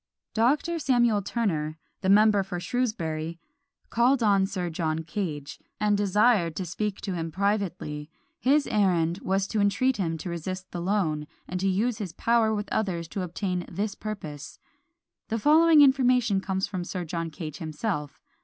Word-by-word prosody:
Dr. 290 +9 +2
Samuel 240 -7 +3
Turner, 165 -8 -1 0.2
the 190 - 0
member 210 0 +6
for 185 -2 -4
Shrewsbury, 170 -8 -2 0.5
called 245 +2 +3
on 200 -2 +4
Sir 180 -3 -3
John 160 0 -1
Cage, 160 -5 -4 0.2
and 210 -1 +2
desired 205 -3 +3
to 185 - -3
speak 205 +4 -3
to 195 - -3
him 165 -2 -3
privately; 185 -6 -2 0.3
his 280 +4 +3
errand 180 -4 +1
was 195 0 0
to 215 +2 -2
entreat 250 +6 +2
him 165 -5 -1
to 175 - -6
resist 185 +3 -5
the 175 - -4
loan, 170 -6 0 0.2
and 180 - -3
to 195 - 0
use 215 +5 0
his 190 -6 -5
power 230 +2 +2
with 210 -1 -2
others 175 -6 -1
to 195 - -4
obtain 180 +1 -2
this 200 +3 -2
purpose. 180 -10 -7 0.7
The 225 - -1
following 310 +5 +6
information 250 -7 +4
comes 190 -1 -1
from 185 -4 -4
Sir 180 0 -4
John 165 0 -3
Cage 155 -1 -7
himself. 155 -1 -4
195 Hz, 160 wpm, -27 LUFS, 170-220 Hz, 0.7 s, member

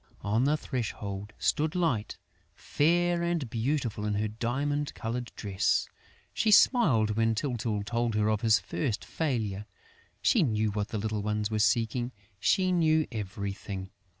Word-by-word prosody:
On 110 +5 +1
the 150 +2 +2
threshold 105 -6 -4
stood 155 +2 0
Light, 130 -12 0 0.4
fair 175 +3 +1
and 170 -5 -1
beautiful 115 -3 -1
in 105 -1 -1
her 105 +1 0
diamond 140 +7 -2
coloured 120 +1 -4
dress. 100 -1 0 0.5
She 220 - +1
smiled 155 - +5
when 115 +1 +1
Tyltyl 115 -4 -2
told 115 +1 -1
her 105 0 +2
of 110 -1 +1
his 110 -2 +5
first 120 -8 -3
failure. 110 -10 -2 0.5
She 230 - +3
knew 110 -7 +1
what 105 0 -2
the 110 - -4
little 105 0 -2
ones 105 +1 -1
were 110 - 0
seeking; 120 +2 +1 0.3
she 185 - +2
knew 160 -3 +3
everything. 100 -2 -5
115 Hz, 145 wpm, -29 LUFS, 105-145 Hz, 0.5 s, smiled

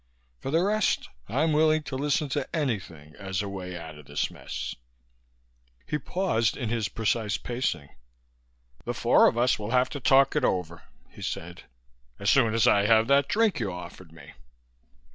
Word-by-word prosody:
For - - -5
the 165 +5 +2
rest, 210 +1 +1 0.2
I'm 155 +7 +1
willing 155 0 +3
to 140 -1 -6
listen 145 +2 0
to 140 +4 -3
anything 90 - -3
as 95 -1 -3
a - - -4
way 90 -2 -6
out 80 -3 -9
of 75 - -15
this 70 - -2
mess." - - -6 1.1
He 150 - -2
paused 145 - 0
in 120 -4 -3
his 110 -3 -1
precise 110 0 -1
pacing. 115 - -3 0.9
"The - - -4
four - - +5
of - - 0
us 125 -1 +2
will 105 0 -5
have 125 +1 +2
to 145 - -6
talk 135 +1 +4
it - - +1
over," 85 -2 -1 0.3
he - - -13
said, 90 +2 -6 0.5
"as - - +1
soon 115 -1 +3
as 115 - +3
I 100 0 +4
have 110 0 +5
that 140 0 +4
drink 215 -7 +2
you 105 -5 -2
offered 90 -1 -10
me." 80 -3 -14
115 Hz, 175 wpm, -27 LUFS, 90-140 Hz, 1.1 s, four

